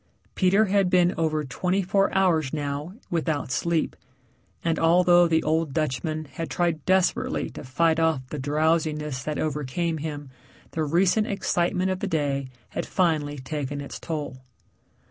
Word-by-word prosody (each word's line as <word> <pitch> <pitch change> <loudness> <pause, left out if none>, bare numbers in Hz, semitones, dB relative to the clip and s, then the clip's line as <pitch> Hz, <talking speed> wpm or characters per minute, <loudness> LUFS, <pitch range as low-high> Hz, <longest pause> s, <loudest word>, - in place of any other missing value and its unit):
Peter 195 +3 +3
had 195 -2 +2
been 180 0 +4
over 155 -2 0
twenty 180 +8 -1
four 195 +2 +2
hours 170 -8 +2
now 145 +3 -4 0.2
without 160 -5 -1
sleep, 170 +3 0 0.7
and 165 -1 0
although 175 +1 +5
the 160 -1 +2
old 160 -2 0
Dutchman 155 +1 -1
had 150 +4 -6
tried 170 -4 0
desperately 185 -1 +1
to - - -9
fight 160 +5 +1
off 160 -4 +2
the 150 - -4
drowsiness 150 -1 0
that 150 +3 -3
overcame 155 +2 -2
him, 145 -3 -6 0.4
the 160 - -1
recent 180 +7 +2
excitement 185 -1 0
of 185 - -2
the 200 - -2
day 145 -6 -1 0.2
had - - -4
finally 155 -5 +1
taken 145 +1 -4
its 140 - -7
toll. 150 -5 -5
160 Hz, 145 wpm, -25 LUFS, 145-175 Hz, 0.7 s, although